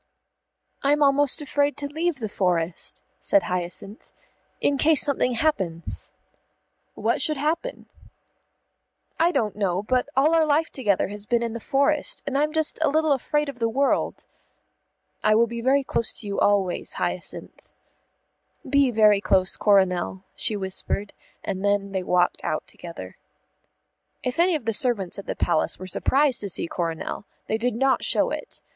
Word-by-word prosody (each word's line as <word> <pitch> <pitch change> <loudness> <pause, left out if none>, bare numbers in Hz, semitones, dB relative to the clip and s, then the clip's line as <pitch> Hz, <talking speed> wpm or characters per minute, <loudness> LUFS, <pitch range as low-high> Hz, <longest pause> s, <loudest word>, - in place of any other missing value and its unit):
"I'm 290 +2 +2
almost 285 +1 +3
afraid 285 0 0
to 285 - -4
leave 320 +4 -1
the 235 -5 -5
forest," 180 -4 -2 0.2
said 200 - +2
Hyacinth, 180 +4 -4 0.5
"in 280 -1 +1
case 310 -2 +5
something 265 -3 +2
happens." 190 - -2 0.8
"What - - 0
should 305 -2 0
happen?" 325 - -2 1.3
"I 335 +2 +4
don't 235 - -1
know; 195 -2 -1
but 255 +5 0
all 290 +5 +3
our 325 -1 +4
life 310 +1 +1
together 205 -9 0
has 205 0 -4
been 235 -1 +1
in 230 -1 -3
the 235 - -5
forest, 280 +5 +2
and 275 - -3
I'm 300 +2 +1
just 315 -1 +1
a 315 - +3
little 315 +1 +1
afraid 295 +2 0
of 275 -3 -7
the 230 -1 +1
world." 275 +4 0 1.0
"I 215 0 +4
will 230 +2 +5
be 235 0 -6
very 270 +3 +2
close 230 -3 0
to - - -12
you 200 -1 -3
always, 195 -3 +1
Hyacinth." - - -4 1.0
"Be 280 -2 +3
very 210 -3 +4
close, 185 -2 +3
Coronel," 190 -2 +1
she 215 - +1
whispered, 195 +1 -3 0.3
and 190 0 -4
then 200 -1 0
they 190 -1 -2
walked 180 -1 +1
out - - -2
together. - - -10 1.1
If 250 +4 -3
any 350 0 +4
of 285 -7 -4
the 225 - 0
servants 205 -6 +1
at 200 - -10
the - - -3
Palace 170 -3 0
were 185 - -8
surprised 265 +8 +1
to 200 - -4
see - - -2
Coronel, 165 +3 -4 0.2
they 220 - -2
did 245 0 -1
not 265 +2 +1
show - - +1
it. - - -6
235 Hz, 160 wpm, -24 LUFS, 200-285 Hz, 1.3 s, case